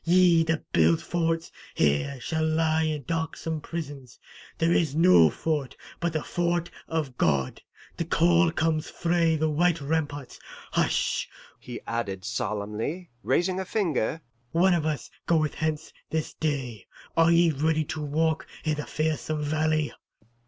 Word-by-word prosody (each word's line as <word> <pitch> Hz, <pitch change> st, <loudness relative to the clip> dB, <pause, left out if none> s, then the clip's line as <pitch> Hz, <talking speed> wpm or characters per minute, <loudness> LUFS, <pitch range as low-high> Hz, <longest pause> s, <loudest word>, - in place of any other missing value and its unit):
Ye 175 Hz, -1 st, +5 dB
that 165 Hz, -1 st, -2 dB
build 80 Hz, 0 st, +4 dB
forts 165 Hz, -1 st, -1 dB, 0.2 s
here 75 Hz, -, +1 dB
shall 160 Hz, +6 st, -2 dB
lie 160 Hz, 0 st, +2 dB
in 155 Hz, -2 st, -1 dB
darksome 160 Hz, +1 st, -3 dB
prisons; 145 Hz, -7 st, -7 dB, 0.4 s
there 165 Hz, +1 st, +2 dB
is 155 Hz, -5 st, +1 dB
no 165 Hz, -, +7 dB
fort 150 Hz, -, -2 dB, 0.2 s
but 170 Hz, -1 st, -1 dB
the 155 Hz, -, -1 dB
Fort 175 Hz, -1 st, -1 dB, 0.2 s
of 150 Hz, -6 st, -3 dB
God. 70 Hz, -5 st, +1 dB, 0.4 s
The 170 Hz, -, -1 dB
call 170 Hz, 0 st, +4 dB
comes 160 Hz, -1 st, 0 dB
frae 170 Hz, -1 st, +1 dB
the 155 Hz, 0 st, +1 dB
white 170 Hz, +2 st, +2 dB
ramparts. 145 Hz, -2 st, -3 dB, 0.3 s
Hush!' -, -, +1 dB, 0.3 s
he 120 Hz, -1 st, -8 dB
added 100 Hz, -5 st, -3 dB
solemnly, 110 Hz, -, -3 dB
raising 185 Hz, +1 st, +1 dB
a -, -, -1 dB
finger. 165 Hz, -, 0 dB, 0.3 s
'One 180 Hz, +3 st, +4 dB
of 160 Hz, -3 st, +1 dB
us 150 Hz, -2 st, -3 dB, 0.2 s
goeth 155 Hz, -3 st, +2 dB
hence 155 Hz, 0 st, -3 dB, 0.2 s
this 160 Hz, -1 st, -2 dB
day; 130 Hz, -9 st, -3 dB, 0.3 s
are 165 Hz, 0 st, +5 dB
ye 170 Hz, 0 st, +5 dB
ready 155 Hz, +2 st, +1 dB
to 155 Hz, +1 st, -5 dB
walk 155 Hz, +2 st, 0 dB, 0.2 s
i' 155 Hz, -, +2 dB
the 150 Hz, -1 st, -4 dB
fearsome 155 Hz, 0 st, -1 dB
valley? 155 Hz, 0 st, 0 dB
155 Hz, 145 wpm, -27 LUFS, 145-165 Hz, 0.4 s, no